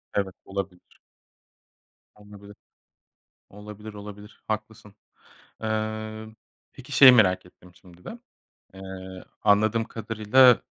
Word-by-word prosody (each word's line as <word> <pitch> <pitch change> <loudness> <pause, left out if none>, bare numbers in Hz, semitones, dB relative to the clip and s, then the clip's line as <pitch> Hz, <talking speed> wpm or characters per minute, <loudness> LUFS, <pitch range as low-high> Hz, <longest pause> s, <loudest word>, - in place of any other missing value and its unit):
Evet, 95 -2 -2
olabilir. 95 -2 -7 1.2
Tam 105 0 -18
da 100 - -13
böyle 100 0 -13 1.0
Olabilir, 105 +1 -11
olabilir 105 +1 -12
haklısın. 110 -1 -6 0.7
Eee, 110 0 -4 0.5
peki 130 +2 -13
şeyi 130 0 +9
merak 95 -6 +3
ettim 90 0 -20
şimdi 90 0 -20
de. 235 - -9 0.6
Eee, 95 - -12 0.6
anladığım 110 +2 +3
kadarıyla 115 +3 +3
105 Hz, 100 wpm, -25 LUFS, 100-110 Hz, 1.2 s, şeyi